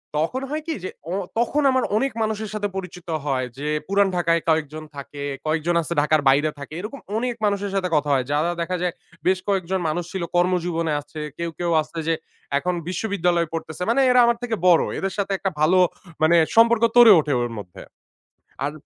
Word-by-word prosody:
তখন 165 - -1
হয় 305 +2 -2
কি 325 - -1
যে 185 - -3 0.2
অ - - -1 0.3
তখন 265 +5 +1
আমার 260 0 +2
অনেক 270 +4 0
মানুষের 220 -1 -2
সাথে 210 -1 -1
পরিচিত 180 -1 -7 0.2
হয়। 130 -3 0
যে 145 +2 -4 0.2
পুরান 200 0 +3
ঢাকায় 170 -1 +2
কয়েকজন 155 -1 0
থাকে, 140 0 -7 0.2
কয়েকজন 160 +2 0
আছে 165 +1 -4
ঢাকার 155 +1 +2
বাইরে 145 +3 +3
থাকে। 140 +2 -9
এরকম 220 +9 -7 0.2
অনেক 245 +1 -1
মানুষের 200 -1 0
সাথে 185 -2 0
কথা 150 -1 +1
হয়। 130 -2 +1
যারা 150 +4 +1
দেখা 180 +2 -2
যায় 180 -1 0 0.3
বেশ 185 0 +3
কয়েকজন 190 -1 0
মানুষ 175 +3 -2
ছিল 190 -2 -3
কর্মজীবনে 175 -2 +1
আছে। 155 +2 -10 0.2
কেউ, 170 0 -2
কেউ 175 -1 0
আছে 160 - -10
যে 165 - +3 0.4
এখন 180 +5 -1
বিশ্ববিদ্যালয়ে 180 -3 0
পড়তেছে। 160 0 -5
মানে 240 +4 +3
এরা 250 0 +5
আমার 235 0 +2
থেকে 235 -2 -1
বড় 175 -2 +6
এদের 195 0 -2
সাথে 200 -1 -1
একটা 195 - -1
মানে 165 - -17
ভালো 175 +4 +4 0.4
মানে 160 +2 +5 0.2
সম্পর্ক 230 0 +5
গড়ে 240 -2 +9
ওঠে 150 -2 0
ওর 120 -1 -2
মধ্যে। 90 -4 -9 0.8
আর 145 - -1
175 Hz, 195 wpm, -23 LUFS, 155-205 Hz, 0.8 s, গড়ে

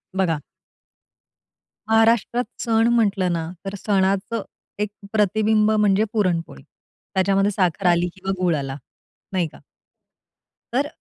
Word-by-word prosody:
बघा. 175 -5 +1 1.5
महाराष्ट्रात 225 +2 +3 0.2
सण 225 0 +2
म्हटलं 200 -6 +2
ना, 165 -1 -3 0.2
तर 195 +1 -4
सणाचं 195 +2 0 0.4
एक 210 0 0 0.2
प्रतिबिंब 215 +1 +3
म्हणजे 210 -1 +3
पुरणपोळी. 170 - -1 0.5
त्याच्यामध्ये 195 +1 +2
साखर 185 -1 0
आली 175 +1 +2
किंवा 190 0 -4
गूळ 175 -3 +3
आला. 135 -2 -4 0.6
नाही 180 -3 +1
का? - - -15 1.1
तर 280 +3 +1
195 Hz, 110 wpm, -22 LUFS, 180-215 Hz, 1.5 s, महाराष्ट्रात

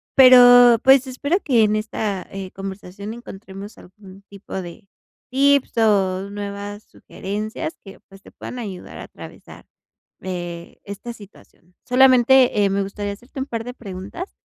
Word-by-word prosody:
pero 245 -2 +8
pues, 270 0 +6
espero 285 +8 -1
que 240 -6 +3
en 210 0 +2
esta, 215 -2 -3
eh, 195 -1 -7
conversación 195 +2 -8
encontremos 200 -3 -11
algún 195 +1 -16
tipo 200 0 -13
de 175 +3 -11 0.4
tips 280 -1 +2
o 195 -3 +1
nuevas 205 0 -7
sugerencias 215 - -6
que 195 -1 -13
pues, 195 0 -16
te - - -16
puedan 250 - -9
ayudar 195 -6 -8
a - - -8
atravesar, - - -13 0.6
eh, 175 -2 -7
esta 200 +4 -8
situación. 195 -4 -18
Solamente, 255 -3 +5
eh, - - +2
me 200 +1 0
gustaría 200 +1 -4
hacerte 245 +6 -11
un 265 - -2
par 230 -4 -5
de 245 +1 -7
preguntas, 200 - -8
205 Hz, 145 wpm, -21 LUFS, 195-245 Hz, 0.6 s, pero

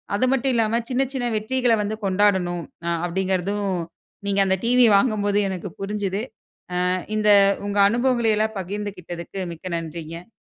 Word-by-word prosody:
அது 210 - +2
மட்டும் 270 0 +1
இல்லாம 225 +1 +2
சின்ன, 260 +1 +1
சின்ன 255 -2 -2
வெற்றிகள 245 +2 +1
வந்து 210 +1 -2
கொண்டாடணும். 185 -3 +2 0.2
அ - - +1 0.2
அப்டிங்கிறதும், 190 +2 -1 0.6
நீங்க 200 0 +1
அந்த 190 0 +2
டிவி 245 +1 +5
வாங்கும்போது 205 -2 +1
எனக்கு 190 0 -5
புரிஞ்சுது. 200 0 -2 0.6
ஆ - - +2 0.3
இந்த 210 0 +2 0.4
உங்க 205 0 -1
அனுபவங்கள 240 0 +1
எல்லாம் 220 -1 0
பகிர்ந்துகிட்டதுக்கு, 190 -2 -6
மிக்க 165 - -15
நன்றிங்க. 165 +1 -7
205 Hz, 140 wpm, -23 LUFS, 185-225 Hz, 0.6 s, டிவி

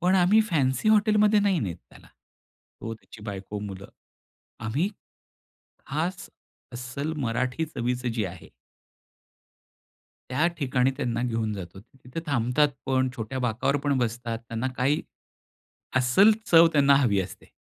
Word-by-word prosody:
पण 180 +2 +3
आम्ही 190 +4 +5
फॅन्सी 140 +4 +1
हॉटेलमध्ये 210 0 +4
नाही 200 -3 +2
नेत 90 -8 -3
त्याला. - - -17 0.7
तो, 115 0 -5
त्याची 110 -1 -15
बायको, 100 0 -6
मुलं, 100 -2 -7 0.7
आम्ही, 125 - 0 1.0
खास 160 +6 -3 0.4
अस्सल 130 +5 -4
मराठी 125 +3 -1
चवीचं 125 -3 -2
जी 110 -3 -1
आहे. 90 -2 -8 1.8
त्या 145 +6 +2
ठिकाणी 130 -3 +2
त्यांना 120 -3 -1
घेऊन 115 -3 -1
जातो. 95 -1 -8
ते 120 +5 -25
तिथे 125 +6 -5
थांबतात 140 +1 +2 0.2
पण 130 -1 +2
छोट्या 115 +3 -4
बाकावर 125 +3 0
पण 145 -1 +2
बसतात. 115 -1 -2
त्यांना 115 +2 -2
काही, 135 +4 +2 1.0
अस्सल 130 - +5 0.2
चव 165 0 +8
त्यांना 140 -2 +5
हवी 115 -8 +3
असते. 95 - -8
125 Hz, 130 wpm, -26 LUFS, 115-150 Hz, 1.8 s, चव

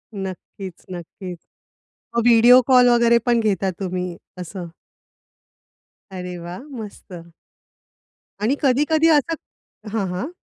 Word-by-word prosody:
नक्कीच, 190 -1 -8
नक्कीच. 180 +1 -8 0.8
मग 235 - +3
व्हिडिओ 240 +2 +7
कॉल 250 -2 +6
वगैरे 235 -1 +5
पण 240 -1 +3
घेता 195 -3 0
तुम्ही, 180 -2 -3 0.2
असं? 180 0 -7 1.4
अरे 180 -1 -6
वाह! 175 +6 -7 0.2
मस्त. 180 -5 -10 1.1
आणि 235 +7 +2
कधी-कधी 300 +4 +3
असं 325 +4 -1 0.6
हां, 200 -4 0
हां. 185 - -3
200 Hz, 105 wpm, -21 LUFS, 180-245 Hz, 1.4 s, व्हिडिओ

